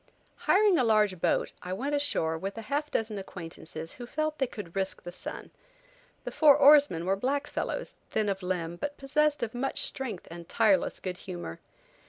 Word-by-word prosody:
HIRING 395 -2 +5
a - - +4
large 210 -6 +3
boat, - - +1
I 180 - -4
went 275 +9 -2
ashore 225 - 0
with 195 +6 -5
a 225 - -5
half 290 +6 -2
dozen 220 -5 -1
acquaintances 165 -3 -7
who 240 -1 -9
felt 310 +3 -2
they 265 - +2
could 200 -7 -9
risk 190 0 -2
the 175 - -6
sun. 175 - -8 0.7
The - - -5
four 295 -3 +6
oarsmen 285 - +6
were 190 +1 +2
black 275 +7 -1
fellows, - - -3 0.2
thin 215 -1 0
of 195 -1 -1
limb, 175 -2 -2
but 290 +9 -4
possessed 295 0 +1
of 225 - -3
much 260 +3 -1
strength 235 -9 -3
and 170 0 -9
tireless 210 -5 +2
good 180 -1 -4
humor. 85 - -7
215 Hz, 185 wpm, -29 LUFS, 180-285 Hz, 0.7 s, four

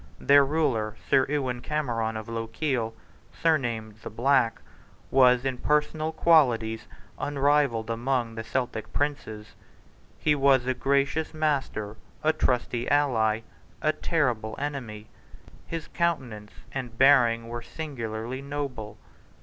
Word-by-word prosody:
Their 140 0 +6
ruler, 135 -8 0
Sir 130 - +4
Ewan 130 -4 -1
Cameron, 120 -7 -2
of 110 +1 -7
Lochiel, 115 +1 -2 0.4
surnamed 120 -9 0
the - - -6
Black, 120 +1 +2 0.5
was 125 -1 +5
in 130 -2 -2
personal 150 +1 0
qualities 125 -10 +3 0.3
unrivalled 140 -5 +1
among 120 0 -1
the 115 0 -5
Celtic 120 -2 -3
princes. 110 -8 -3 0.6
He 150 - +2
was 135 -3 +3
a 130 - +1
gracious 140 +5 0
master, 135 -9 -1 0.3
a 155 +1 +3
trusty 125 -4 0
ally, 115 -7 +2 0.4
a 155 0 +1
terrible 125 -10 -1
enemy. 130 -7 -5 0.6
His 165 -2 -5
countenance 130 -12 -2 0.2
and 125 -4 -6
bearing 120 -4 +5
were 120 +1 -5
singularly 120 -4 -5
noble. 140 -7 -5
130 Hz, 115 wpm, -27 LUFS, 115-145 Hz, 0.6 s, Their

